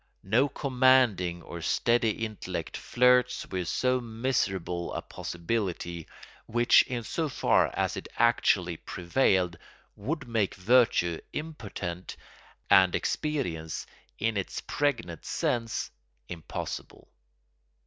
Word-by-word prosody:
No 120 +9 +3
commanding 125 - +3
or 85 - -8
steady 115 +4 +1
intellect 110 -2 -5
flirts 125 0 +3
with 90 -2 -3
so 130 +4 +1
miserable 110 -7 -2
a - - -3
possibility, 85 -3 -3 0.4
which 120 +1 +5
in 120 -2 -3
so 160 +6 -2
far - - +3
as - - 0
it - - -6
actually 90 -7 +3
prevailed 90 -2 +1 0.4
would 140 +6 -4
make 110 -4 0
virtue 95 -5 +3
impotent 105 - -6 0.5
and 95 -2 +6
experience, 90 - -2 0.3
in 110 0 0
its 95 - -3
pregnant 115 - -2
sense, 115 -1 -1 0.4
impossible. 85 -3 -6
110 Hz, 100 wpm, -28 LUFS, 90-125 Hz, 0.5 s, and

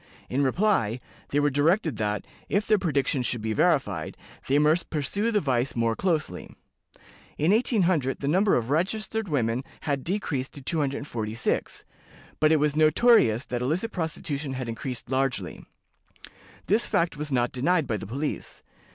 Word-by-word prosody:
In 135 - +1
reply, 130 - +1 0.3
they 145 - +1
were 145 0 +2
directed 155 - +2
that, 105 -1 -2 0.2
if 205 +1 +1
their 215 -1 +3
prediction 140 -6 0
should 125 -1 -1
be 110 0 -1
verified, - - +1 0.3
they 140 - +3
must 155 +3 +2
pursue 170 - -1
the 215 -2 +2
vice 130 -5 0
more 115 -1 +1
closely. 155 - -2 0.8
In 155 +5 +2
1800 185 - +2
the 140 - -3
number 190 +7 +3
of 120 +2 -1
registered 215 +6 -1
women 125 -3 0 0.2
had 140 -3 -2
decreased 160 -8 -2
to 140 - -8
246, 135 -7 -2 0.5
but 155 0 +4
it 160 - +4
was 150 0 +1
notorious 155 - +4
that 125 -1 -3
illicit 170 - -1
prostitution 155 -4 -3
had 130 -2 -4
increased 120 +2 -5
largely. 135 -1 -1 1.0
This 215 +4 +2
fact 170 0 +1
was 150 0 -5
not 120 -2 +1
denied 160 +5 +1
by 110 - -1
the 105 - -7
police. 140 +7 -4
145 Hz, 150 wpm, -26 LUFS, 125-175 Hz, 1.0 s, but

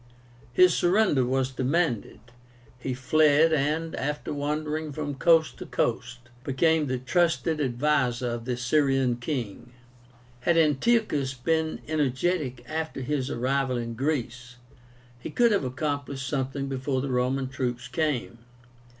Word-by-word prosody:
His 180 +7 +5
surrender 175 -7 +3
was 130 +1 0
demanded. 130 -1 -1 0.6
He 125 0 -3
fled, 155 +4 +4
and, 155 +3 0
after 150 +2 -3
wandering 150 +1 -2
from 145 0 -4
coast 160 +3 +3
to - - -7
coast, 120 +1 -2 0.2
became 150 +3 +2
the 130 0 -1
trusted 165 +3 +1
adviser 125 -2 +1
of 120 -1 -4
the 125 -1 -2
Syrian 135 -1 +2
king. 120 -3 -5 0.7
Had 165 +7 +2
Antiochus 150 - +2
been 160 +4 -1
energetic 145 -2 -1
after 160 -1 -4
his 135 0 -2
arrival 130 0 0
in 115 -1 -4
Greece, 125 -2 -3 0.6
he 125 - -7
could 235 +8 +3
have 200 - +2
accomplished 140 0 -3
something 135 0 -2
before 135 0 -2
the 135 0 -3
Roman 130 +2 0
troops 125 -2 -3
came. 125 -3 -2
135 Hz, 125 wpm, -26 LUFS, 125-155 Hz, 0.7 s, His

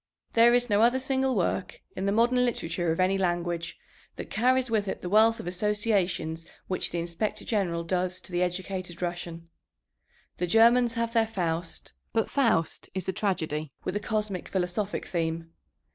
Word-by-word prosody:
There 235 +1 +6
is 245 0 +2
no 205 -2 +3
other 240 +3 +5
single 265 0 0
work 185 0 -1 0.2
in 190 +1 -2
the - - +2
modern 240 +4 +3
literature 175 -8 -1
of 165 - -2
any 190 +1 +2
language 175 -2 -1 0.4
that - - -8
carries 255 +2 +2
with 215 -3 0
it - - -3
the 180 - -3
wealth 220 +2 +5
of - - -7
associations 185 -4 0 0.2
which 185 - -1
the 175 - -4
Inspector 170 +5 -3
General 180 -6 0
does 185 +1 -1
to - - -10
the 175 0 0
educated 180 0 -3
Russian. 170 -1 -5 0.9
The 180 - -1
Germans 235 +4 +5
have 230 0 -1
their 225 -2 +3
Faust; 170 -5 -3 0.2
but 225 -1 0
Faust 230 - +1
is 190 -2 -3
a 190 - 0
tragedy 160 - -2
with 185 - -3
a - - +1
cosmic 210 -4 -2
philosophic 190 +2 -2
theme. 165 -1 -2
190 Hz, 170 wpm, -28 LUFS, 175-225 Hz, 0.9 s, There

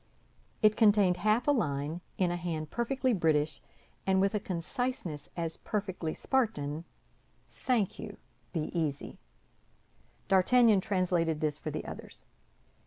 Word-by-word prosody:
It 215 0 +6
contained 205 -5 +4
half 215 +5 +2
a - - +6
line, 150 - -1 0.2
in 180 -2 +2
a - - -1
hand 165 -3 -4
perfectly 255 +1 0
British, 155 -5 +1 0.5
and 190 0 +4
with 195 +2 +2
a 210 - +1
conciseness 180 - -3
as 165 -1 -3
perfectly 190 -6 -3
Spartan: 165 - -1 0.7
Thank 230 -7 0
you; 210 -2 -7 0.3
be 160 -4 -2
easy. 155 -5 -2 1.1
D'Artagnan 215 +2 +5
translated 180 -5 +1
this 150 -1 0
for - - -4
the - - -4
others. - - -9
185 Hz, 125 wpm, -31 LUFS, 160-215 Hz, 1.1 s, It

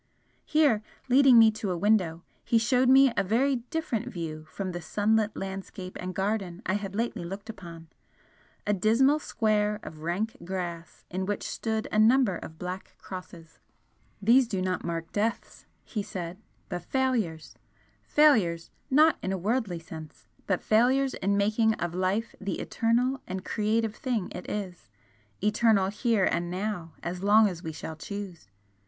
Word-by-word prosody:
Here, 295 -9 +3 0.3
leading 260 -1 +7
me 225 -1 +8
to 215 -2 -4
a 180 - -1
window, 180 -4 +2 0.2
he 230 - +2
showed 250 +2 +3
me 270 -1 +7
a - - +2
very 255 +7 +2
different 245 -1 -3
view 155 -3 -6
from 190 +1 -4
the 175 0 -5
sunlit 210 +4 +1
landscape 190 -1 -6
and 185 0 -5
garden 195 -1 -2
I 185 - 0
had 200 -1 -3
lately 230 -4 -2
looked 195 +5 -6
upon, 170 -5 -11 0.8
a 205 - +2
dismal 230 +9 +3
square 210 -5 0
of 155 0 -9
rank 195 +10 -2
grass 175 -2 -5
in 190 +1 -2
which 205 - -2
stood 220 -1 -2
a 215 - +2
number 225 -4 +4
of 160 - -10
black 180 +2 -6
crosses. 175 -3 -10 0.6
"These 240 +5 +5
do 200 -5 -2
not 185 0 -1
mark 165 -1 -4
deaths," 220 +2 -3 0.2
he 215 - -4
said 180 -2 -6 0.3
"but 175 -1 -4
failures! 225 - -1 0.5
Failures 185 - +3 0.2
not 310 +4 +5
in 190 - -2
a 190 - -1
worldly 205 -1 -1
sense 160 -2 -10 0.2
but 185 -3 0
failures 260 +5 +3
in 200 +1 0
making 215 +2 +2
of 175 0 -3
life 190 +5 -1
the 195 0 -3
eternal 250 +4 0
and 185 0 -5
creative 215 +1 0
thing 230 -7 -2
it 180 - -7
is 185 - -5 0.5
eternal 210 -2 +3
HERE 215 -1 +1
and 175 0 0
now, 180 -3 -4
as 180 +1 -4
long 210 +2 +6
as 175 -4 -5
we 160 - -5
shall 160 +1 -7
choose! 185 - -7
205 Hz, 160 wpm, -28 LUFS, 180-225 Hz, 0.8 s, me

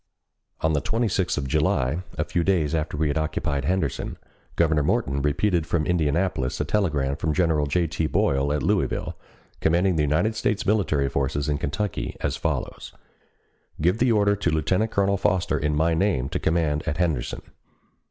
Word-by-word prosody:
On 80 0 +2
the 75 - +1
26th 105 -5 0
of 70 -2 -2
July, 75 +1 +1 0.2
a - - +1
few 85 - -1
days 85 -5 +1
after 80 -2 -2
we 80 0 +1
had 75 - 0
occupied 75 -2 -2
Henderson, 90 -6 -1 0.4
Governor 80 -3 +2
Morton 70 -1 0
repeated 80 +4 +1
from 80 -2 0
Indianapolis 80 -5 0
a - - 0
telegram 75 -10 0
from 75 -1 -1
General 80 -5 +2
J. 85 +5 +1
T. 80 0 -1
Boyle 70 -1 +1
at 75 -1 -1
Louisville, - - 0 0.4
commanding 85 +2 +2
the - - +2
United 75 +10 +1
States 105 -2 -1
military 95 -10 +1
forces 70 +1 -1
in 75 -1 0
Kentucky 95 +6 -3
as - - -1
follows: - - -3 0.9
"Give 90 +7 +2
the 125 0 +3
order 100 -2 +3
to 100 -4 -1
Lieutenant 90 +7 +1
Colonel 100 -1 +1
Foster 95 -2 +1
in 75 +1 0
my 80 +2 +2
name 80 -7 +1
to - - -2
command 80 -2 +1
at 75 - -1
Henderson." 80 -8 -1
80 Hz, 170 wpm, -24 LUFS, 75-95 Hz, 0.9 s, the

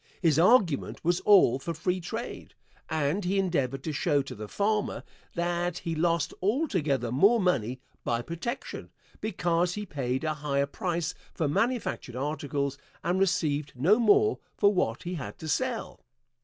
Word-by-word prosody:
His 160 -3 +3
argument 185 - +3
was 175 +1 +3
all 185 - +5
for 165 +4 -4
free 180 +3 -1
trade, 225 +8 -6 0.3
and 160 +5 0
he 190 +3 0
endeavored 135 -9 0
to 160 - -2
show 145 0 +1
to 135 - -8
the 105 -2 -7
farmer 210 - -1 0.3
that 175 0 -1
he 165 -2 -3
lost 165 -1 +1
altogether 185 - 0
more 200 - +5
money 130 - 0 0.2
by 120 0 -1
protection, 170 - -5 0.3
because 175 -4 0
he 210 0 -4
paid 130 -6 -2
a 155 -1 0
higher 145 -2 0
price 170 +1 -2 0.2
for 160 - 0
manufactured 205 - -1
articles 140 0 -2 0.2
and 180 +2 +1
received 155 -7 +1
no 180 - +4
more 415 - +4 0.2
for 205 0 +4
what 120 - 0
he 175 - -4
had 150 -7 -6
to 160 - -7
sell. 250 - -2
170 Hz, 155 wpm, -28 LUFS, 140-195 Hz, 0.3 s, all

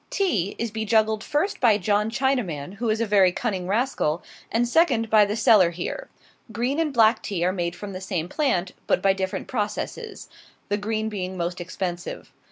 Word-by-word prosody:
Tea 210 - 0
is 230 -1 -3
bejuggled 220 0 +1
first 350 +8 -1
by 225 -5 +5
John 210 +2 +1
Chinaman, 215 - -1
who 230 +1 -1
is 215 +1 +1
a - - +2
very 200 -3 +4
cunning 190 -3 -3
rascal; 200 - 0 0.3
and 240 +1 +2
second, 245 -6 +2
by 215 -1 +6
the 205 +1 -2
seller 210 -5 +5
here. 180 - -5 0.4
Green 245 +7 -1
and 320 -2 +1
black 225 -3 +4
tea 175 -4 -2
are 185 - +1
made 175 -2 -2
from 200 +2 -7
the 185 - -6
same 180 -4 -3
plant, 185 - 0 0.2
but - - +3
by 195 -1 +3
different 190 -1 -3
processes 255 - -4 0.4
the 205 - +1
green 215 +1 -2
being 190 -3 -4
most 175 +1 -3
expensive. 175 0 -5
210 Hz, 180 wpm, -24 LUFS, 185-235 Hz, 0.4 s, by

